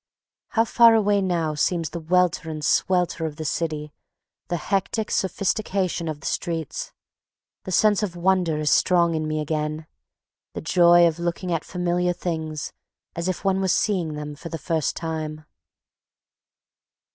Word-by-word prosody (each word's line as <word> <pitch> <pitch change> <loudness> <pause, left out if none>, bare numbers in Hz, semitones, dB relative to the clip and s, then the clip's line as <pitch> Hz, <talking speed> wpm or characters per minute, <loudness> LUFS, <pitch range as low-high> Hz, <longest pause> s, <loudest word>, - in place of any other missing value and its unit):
How 225 - +5
far 230 0 +6
away 205 -2 +3
now 170 -4 0
seems 165 +1 0
the 170 - -5
welter 175 0 +1
and 155 -1 -4
swelter 175 0 +1
of 150 - -7
the 155 - -6
city, 150 -1 -3 0.5
the 175 - -1
hectic 200 +5 -1
sophistication 190 -2 -1
of 155 -1 -5
the - - -11
streets. 175 - -3 0.7
The 185 - -5
sense 210 +2 +4
of 195 -5 -3
wonder 175 -2 +1
is 150 -1 0
strong 170 -2 +3
in 155 -1 -2
me 155 0 -1
again, 155 0 -2 0.7
the - - -4
joy 175 0 +5
of 165 0 +1
looking 170 +1 -2
at 165 -2 0
familiar 180 0 0
things 160 -4 -4 0.4
as 170 +1 -3
if 185 - -3
one 195 0 +2
were 190 - +1
seeing 180 -4 +1
them 150 0 -6
for 165 +3 -9
the 165 - -4
first 160 0 -1
time. 155 -2 -4
170 Hz, 155 wpm, -24 LUFS, 155-185 Hz, 0.7 s, far